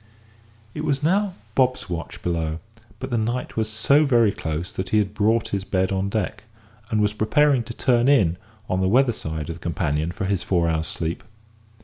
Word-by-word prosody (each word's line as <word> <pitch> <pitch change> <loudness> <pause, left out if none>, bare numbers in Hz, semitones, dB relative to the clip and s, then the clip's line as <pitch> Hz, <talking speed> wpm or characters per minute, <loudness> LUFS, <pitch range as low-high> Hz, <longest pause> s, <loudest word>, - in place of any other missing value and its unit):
It 150 - -5
was 145 -2 0
now 190 +3 +2 0.2
Bob's 130 -2 +1
watch 85 -4 -6
below; 80 -2 -1 0.4
but 130 +3 -6
the 120 - +1
night 120 +3 -2
was 110 -1 -1
so 140 +7 +3
very 120 -7 +4
close 80 +1 -4
that 95 - -4
he 110 - +2
had 105 -1 +1
brought 110 +2 +1
his 100 -1 -2
bed 95 -1 0
on 95 0 0
deck, 105 0 -2 0.5
and 110 - +1
was 105 0 +2
preparing 130 +6 +3
to 115 - -7
"turn 120 -1 +2
in" 100 -12 +4 0.3
on 90 0 0
the 95 - +2
weather 125 +2 +4
side 80 -5 -5
of 85 - -5
the - - -19
companion 80 -2 -1
for 95 - -4
his 95 -1 0
four 85 -3 +1
hours' 80 -1 0
sleep. 80 +1 -4
105 Hz, 200 wpm, -23 LUFS, 85-120 Hz, 0.5 s, very